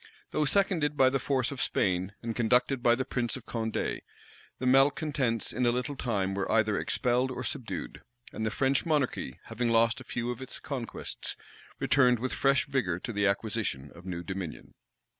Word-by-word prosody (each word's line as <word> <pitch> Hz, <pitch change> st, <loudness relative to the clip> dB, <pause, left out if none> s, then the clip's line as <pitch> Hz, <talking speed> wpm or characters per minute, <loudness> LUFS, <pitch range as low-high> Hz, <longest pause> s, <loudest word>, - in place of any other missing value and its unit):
Though 155 Hz, -, +1 dB
seconded 160 Hz, -3 st, +2 dB
by 130 Hz, -1 st, +5 dB
the 135 Hz, -, +1 dB
force 130 Hz, -1 st, 0 dB
of 140 Hz, -, -4 dB
Spain, 95 Hz, +1 st, 0 dB
and 115 Hz, -1 st, -3 dB
conducted 125 Hz, +2 st, +2 dB
by 120 Hz, -1 st, +5 dB
the 130 Hz, +1 st, -2 dB
prince 125 Hz, -1 st, -1 dB
of 125 Hz, -, -12 dB
Condé, 110 Hz, -1 st, -2 dB, 0.6 s
the 130 Hz, -, -4 dB
malecontents 135 Hz, -2 st, +2 dB
in 125 Hz, -, -1 dB
a -, -, +5 dB
little 125 Hz, +4 st, -2 dB
time 100 Hz, -7 st, -1 dB
were 100 Hz, 0 st, -2 dB
either 110 Hz, -2 st, +3 dB
expelled 125 Hz, +4 st, +1 dB
or 125 Hz, 0 st, -4 dB
subdued; 110 Hz, -, -4 dB, 0.3 s
and 110 Hz, -, -4 dB
the 110 Hz, -, +1 dB
French 135 Hz, +5 st, +2 dB
monarchy, 145 Hz, -, -1 dB
having 120 Hz, -1 st, -2 dB
lost 115 Hz, 0 st, +3 dB
a -, -, -9 dB
few 120 Hz, 0 st, -3 dB
of 125 Hz, +1 st, -7 dB
its 130 Hz, -, -6 dB
conquests, 130 Hz, -6 st, -5 dB, 0.4 s
returned 125 Hz, -3 st, +4 dB
with 130 Hz, +3 st, -3 dB
fresh 135 Hz, 0 st, +3 dB
vigor 125 Hz, -, 0 dB
to 115 Hz, -, -5 dB
the 100 Hz, 0 st, +2 dB
acquisition 100 Hz, -9 st, -1 dB
of 85 Hz, +2 st, -13 dB
new 85 Hz, -1 st, -4 dB
dominion. 95 Hz, -2 st, -6 dB
120 Hz, 180 wpm, -29 LUFS, 110-135 Hz, 0.6 s, by